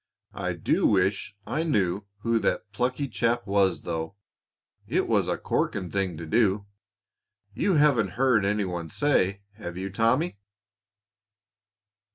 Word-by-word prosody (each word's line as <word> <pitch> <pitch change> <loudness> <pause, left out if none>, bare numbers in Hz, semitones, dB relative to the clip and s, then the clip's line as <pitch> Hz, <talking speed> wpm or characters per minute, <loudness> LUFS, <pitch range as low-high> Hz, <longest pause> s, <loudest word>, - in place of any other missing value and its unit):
I - - -2
do - - +1
wish 95 0 +1
I 155 - -1
knew 100 - 0 0.2
who 115 0 +2
that 105 - -1
plucky 125 +6 -1
chap 120 -1 0
was, 100 -2 +2
though. 80 +2 -4 0.7
It - - +1
was - - +2
a - - 0
corking 95 -4 -1
thing 95 -4 -1
to 85 - -6
do. 100 +3 +2 0.9
You 190 - +1
haven't 130 - +3
heard 125 -5 +3
any 105 +1 +1
one 85 -3 -4
say, 100 - +1
have 90 -5 -7
you, 95 +1 -4
Tommy?" 115 - +1
100 Hz, 135 wpm, -26 LUFS, 95-120 Hz, 0.9 s, haven't